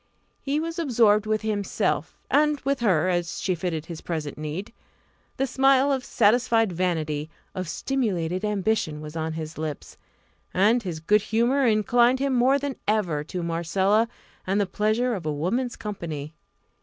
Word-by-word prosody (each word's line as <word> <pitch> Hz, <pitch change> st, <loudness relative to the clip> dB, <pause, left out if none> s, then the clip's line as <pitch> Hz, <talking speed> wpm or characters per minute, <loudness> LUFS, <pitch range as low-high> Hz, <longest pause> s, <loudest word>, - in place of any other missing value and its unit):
He 285 Hz, +2 st, -1 dB
was 330 Hz, +2 st, -4 dB
absorbed 225 Hz, -8 st, +3 dB
with 215 Hz, 0 st, 0 dB
himself, 205 Hz, -2 st, -1 dB
and 300 Hz, 0 st, +3 dB
with 275 Hz, 0 st, 0 dB
her, 185 Hz, -8 st, +2 dB
as 175 Hz, -2 st, -1 dB
she 185 Hz, -, 0 dB
fitted 165 Hz, -2 st, -3 dB
his 165 Hz, -2 st, -8 dB
present 155 Hz, -4 st, -4 dB
need. 155 Hz, +9 st, -5 dB, 0.6 s
The 270 Hz, -, +1 dB
smile 270 Hz, +1 st, +3 dB
of 265 Hz, -2 st, 0 dB
satisfied 225 Hz, -1 st, +3 dB
vanity, 160 Hz, -4 st, -1 dB, 0.2 s
of 185 Hz, -3 st, -4 dB
stimulated 185 Hz, -11 st, -1 dB
ambition, 210 Hz, -6 st, 0 dB
was 150 Hz, +1 st, -8 dB
on 160 Hz, 0 st, -2 dB
his 155 Hz, -1 st, -6 dB
lips; 155 Hz, -2 st, -5 dB, 0.6 s
and 215 Hz, +6 st, +4 dB
his 170 Hz, -6 st, -5 dB
good 210 Hz, +6 st, +3 dB
humour 235 Hz, +5 st, +2 dB
inclined 240 Hz, +3 st, +3 dB
him 275 Hz, 0 st, 0 dB
more 255 Hz, +3 st, +4 dB
than 280 Hz, -1 st, -4 dB
ever 185 Hz, -9 st, +1 dB
to 180 Hz, +2 st, -4 dB
Marcella, 190 Hz, +6 st, +1 dB, 0.4 s
and 195 Hz, +2 st, +1 dB
the 205 Hz, -, +2 dB
pleasure 215 Hz, +6 st, 0 dB
of 180 Hz, -7 st, -4 dB
a -, -, +1 dB
woman's 215 Hz, -, -1 dB
company. 165 Hz, -9 st, -6 dB
205 Hz, 155 wpm, -25 LUFS, 165-245 Hz, 0.6 s, and